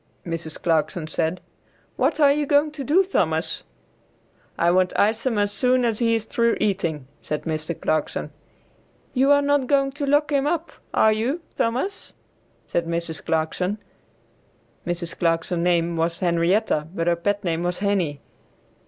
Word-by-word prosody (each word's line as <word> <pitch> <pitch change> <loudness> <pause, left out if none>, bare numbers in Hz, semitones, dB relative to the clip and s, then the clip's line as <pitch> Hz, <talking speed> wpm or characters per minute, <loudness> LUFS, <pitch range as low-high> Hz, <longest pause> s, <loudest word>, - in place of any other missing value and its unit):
Mrs. 165 -2 -4
Clarkson 160 0 0
said, 160 +3 -2 0.5
"What - - +1
are 285 -2 +6
you 295 0 0
going 290 +1 +3
to 295 -2 -6
do, 320 +9 +4
Thomas?" 385 - -1 0.9
"I 170 +1 +3
want 185 0 +2
Isom 225 +3 +1
as 205 0 +1
soon 250 +2 +2
as 225 -2 0
he 230 -1 +3
is 225 - -1
through 235 0 +1
eating," 170 -9 -1 0.2
said 150 - -4
Mr. 160 0 -3
Clarkson. 155 -1 -1 0.8
"You 265 +1 +3
are 285 0 +5
not 285 -2 +2
going 275 0 +2
to 285 +1 -4
lock 290 +1 +2
him 280 0 +2
up, 335 +1 -1 0.2
are 220 - +4
you 250 +10 -1
Thomas?" 260 +13 -2 0.5
said 170 -1 -1
Mrs. 170 -2 -3
Clarkson. 165 +5 -1 1.1
Mrs. 175 -1 -3
Clarkson's 170 +1 0
name 170 -1 +2
was 165 +1 0
Henrietta, 170 -1 +1
but 165 - -1
her 170 0 +3
pet 205 +4 -1
name 170 -2 -1
was 175 0 -1
Henie. 185 -8 0
195 Hz, 155 wpm, -23 LUFS, 170-265 Hz, 1.1 s, are